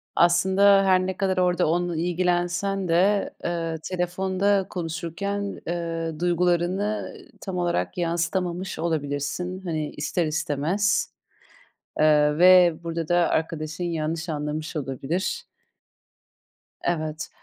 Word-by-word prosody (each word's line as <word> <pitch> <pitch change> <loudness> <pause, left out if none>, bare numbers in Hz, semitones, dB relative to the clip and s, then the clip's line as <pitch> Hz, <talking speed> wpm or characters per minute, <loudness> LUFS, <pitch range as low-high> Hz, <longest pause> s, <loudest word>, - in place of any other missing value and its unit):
Aslında 190 +3 +5
her 185 -1 +4
ne 190 -1 -4
kadar 190 -1 0
orada 180 -2 +2
onunla 175 0 0
ilgilensen 180 +2 0
de, 195 +5 +2
eee, 165 -1 -2
telefonda 190 +2 0
konuşurken, 185 +4 -4
eee, 165 -2 -3
duygularını 180 +4 0 0.2
tam 190 -2 -5
olarak 175 0 -1
yansıtamamış 175 +2 -2
olabilirsin 160 +3 -2
hani 155 -3 -2
ister 150 +4 -1
istemez. 160 +5 0 0.9
Eee, 150 -1 +4
ve 180 -1 +7
burada 165 -1 -4
da 175 - +3
arkadaşın 160 +1 -2
yanlış 165 0 -2
anlamış 155 +1 -4
olabilir. 155 - -3 1.4
Evet. 155 -2 -2
175 Hz, 100 wpm, -25 LUFS, 160-185 Hz, 1.4 s, ve